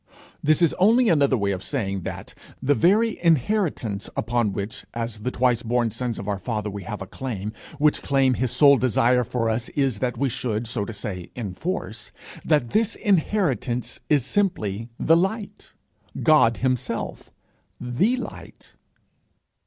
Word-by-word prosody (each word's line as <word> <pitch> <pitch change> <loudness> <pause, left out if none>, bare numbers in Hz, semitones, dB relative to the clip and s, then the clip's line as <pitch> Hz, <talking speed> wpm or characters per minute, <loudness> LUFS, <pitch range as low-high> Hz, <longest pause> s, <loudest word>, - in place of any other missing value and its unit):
This 155 +3 +3
is 165 - +4
only 225 +5 +5
another 140 -5 +3
way 100 -2 0
of 95 -1 -4
saying 100 -9 -2
that - - -7 0.3
the 145 - +2
very 205 +8 +2
inheritance 160 - +1
upon 120 -3 0
which, 100 +2 -5
as 115 -2 -3
the 110 - -2
twice 125 -2 +1
born 120 0 0
sons 120 +1 -3
of 100 - -6
our 100 -2 -1
father, 105 0 -3
we 100 0 -6
have 105 0 -5
a - - -8
claim 105 -1 -5 0.2
which 150 0 +2
claim 135 -2 +2
his 125 +1 -1
sole 140 +3 +6
desire 125 0 +3
for 115 0 -2
us 115 +1 -1
is 135 -7 0
that 125 -1 -2
we 140 - +1
should, 120 -3 -2
so 110 -3 -2
to 115 - -6
say, 95 -5 -5
enforce 110 - -4 0.3
that 150 -7 +1
this 220 0 +1
inheritance 160 - 0
is 145 -5 +3
simply 115 - -1
the 165 - +4
light, 195 +5 -2 0.5
God 115 -8 +5
himself, 130 0 -2 0.5
the 125 - +1
Light. - - -9
125 Hz, 155 wpm, -24 LUFS, 110-155 Hz, 0.5 s, sole